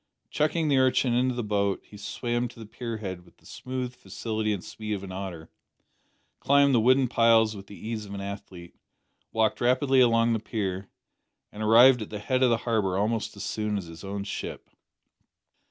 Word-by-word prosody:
Chucking 155 Hz, +1 st, +1 dB
the 140 Hz, -2 st, +3 dB
urchin 130 Hz, -1 st, +3 dB
into 125 Hz, +1 st, +1 dB
the 120 Hz, -, -2 dB
boat 100 Hz, -2 st, 0 dB
he -, -, -15 dB
swam 120 Hz, +3 st, -2 dB
to 120 Hz, -, -15 dB
the 110 Hz, -, -8 dB
pier 115 Hz, +1 st, -6 dB
head 95 Hz, -4 st, -6 dB
with -, -, -23 dB
the -, -, -27 dB
smooth 125 Hz, -1 st, -5 dB
facility 110 Hz, -3 st, -3 dB
and 100 Hz, -4 st, -3 dB
speed 105 Hz, -1 st, -5 dB
of 100 Hz, -, -7 dB
an 95 Hz, -, -7 dB
otter, 95 Hz, -4 st, -7 dB, 0.9 s
climbed 140 Hz, 0 st, +4 dB
the 120 Hz, -, +5 dB
wooden 130 Hz, +3 st, +4 dB
piles 115 Hz, -2 st, +4 dB
with 100 Hz, 0 st, -10 dB
the 100 Hz, -, -11 dB
ease 110 Hz, -1 st, -5 dB
of 100 Hz, -, -7 dB
an -, -, -5 dB
athlete, 100 Hz, -3 st, -8 dB, 0.6 s
walked 110 Hz, -1 st, +1 dB
rapidly 130 Hz, +2 st, +3 dB
along 115 Hz, -1 st, +4 dB
the 110 Hz, -, 0 dB
pier, 100 Hz, -3 st, -4 dB, 0.6 s
and 105 Hz, -, -9 dB
arrived 120 Hz, +3 st, +6 dB
at 105 Hz, -, -6 dB
the 105 Hz, -, -5 dB
head 130 Hz, +5 st, -1 dB
of 130 Hz, -, +5 dB
the 115 Hz, -, +3 dB
harbour 105 Hz, -6 st, +1 dB
almost 110 Hz, +2 st, -1 dB
as -, -, -6 dB
soon 105 Hz, -1 st, -2 dB
as 95 Hz, -, -5 dB
his 85 Hz, +2 st, -11 dB
own 100 Hz, 0 st, -4 dB
ship. 100 Hz, -, -6 dB
110 Hz, 195 wpm, -27 LUFS, 100-125 Hz, 0.9 s, arrived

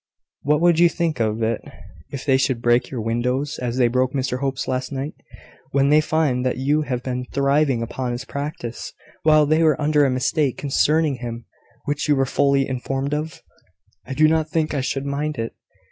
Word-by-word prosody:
What 150 Hz, +2 st, +1 dB
would 170 Hz, -1 st, +4 dB
you 175 Hz, 0 st, +6 dB
think 165 Hz, -5 st, -2 dB
of 110 Hz, 0 st, 0 dB
it, 110 Hz, 0 st, 0 dB, 0.5 s
if 135 Hz, -2 st, -7 dB
they 135 Hz, -3 st, +4 dB
should 130 Hz, -2 st, 0 dB
break 120 Hz, +1 st, +2 dB
your 125 Hz, -4 st, -4 dB
windows, 125 Hz, +6 st, -1 dB
as 125 Hz, 0 st, -3 dB
they 125 Hz, -2 st, +4 dB
broke 130 Hz, +2 st, 0 dB
Mr 130 Hz, -2 st, -1 dB
Hope's 135 Hz, -1 st, -2 dB
last 130 Hz, +1 st, -2 dB
night, 140 Hz, +2 st, -4 dB, 0.6 s
when 140 Hz, 0 st, +3 dB
they 150 Hz, +1 st, +5 dB
find 155 Hz, -5 st, 0 dB
that 130 Hz, -1 st, -1 dB
you 145 Hz, +4 st, +1 dB
have 125 Hz, -4 st, -3 dB
been 125 Hz, -1 st, -3 dB
thriving 140 Hz, -3 st, +2 dB
upon 125 Hz, +2 st, -3 dB
his 120 Hz, +1 st, -5 dB
practice, 140 Hz, -5 st, -6 dB, 0.3 s
while 155 Hz, -1 st, +5 dB
they 155 Hz, +2 st, +2 dB
were 155 Hz, -3 st, +3 dB
under 150 Hz, 0 st, +3 dB
a 140 Hz, -, +3 dB
mistake 130 Hz, +2 st, 0 dB
concerning 150 Hz, +1 st, +1 dB
him 115 Hz, -1 st, -6 dB, 0.4 s
which 145 Hz, +1 st, -2 dB
you 145 Hz, -, +5 dB
were 135 Hz, -1 st, +2 dB
fully 140 Hz, 0 st, +2 dB
informed 135 Hz, +2 st, -3 dB
of?" 155 Hz, +2 st, -4 dB, 0.6 s
"I 135 Hz, -, -6 dB
do 155 Hz, +2 st, +5 dB
not 160 Hz, 0 st, +1 dB
think 155 Hz, -1 st, 0 dB
I 140 Hz, -, 0 dB
should 135 Hz, +1 st, -2 dB
mind 145 Hz, +1 st, -2 dB
it. 115 Hz, 0 st, -3 dB
135 Hz, 195 wpm, -22 LUFS, 125-150 Hz, 0.6 s, you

